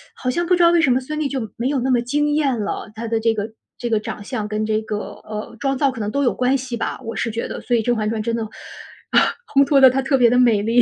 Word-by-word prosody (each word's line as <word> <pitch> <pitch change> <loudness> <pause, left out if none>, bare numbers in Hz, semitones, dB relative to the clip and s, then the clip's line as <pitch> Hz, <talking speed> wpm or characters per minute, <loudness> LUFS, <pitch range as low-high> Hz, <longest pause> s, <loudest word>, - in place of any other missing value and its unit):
好 255 - -3
像 345 +6 -1
不 360 - +4
知 350 - +3
道 340 - +6
为 345 -1 +4
什 275 -5 +3
么 250 - +3
孙 305 +4 -5
俪 295 -2 -1
就 255 -6 -4
没 235 - -1
有 275 0 0
那 260 +2 0
么 245 -2 +3
惊 295 +5 0
艳 285 -5 +1
了， 205 +1 -4
她 230 +1 -5
的 225 0 0
这 225 0 +2
个 215 0 -4 0.3
这 240 -2 -4
个 220 -2 +2
长 210 -1 -6
相 215 -1 -4
跟 215 +1 -2
这 215 0 0
个， 215 -1 -4 0.3
呃， 215 +1 -6
妆 270 -1 0
造 275 0 +2
可 255 - -9
能 210 -1 -2
都 280 +4 0
有 245 - +2
关 255 +2 +1
系 255 -2 -5
吧， - - -3
我 230 - -5
是 230 - -1
觉 230 +1 -3
得。 - - -6
所 245 - 0
以 230 - +2
《甄 245 - +2
嬛 215 -1 -1
传》 220 -1 -2
真 230 - 0
的， 230 - -2 1.1
烘 280 0 +5
托 275 -1 +4
得 260 - +9
她 265 +2 0
特 270 +1 +1
别 245 -2 +5
地 245 +1 +3
美 235 -5 +4
丽， 230 +3 +3
245 Hz, 325 characters per minute, -21 LUFS, 225-270 Hz, 1.1 s, 得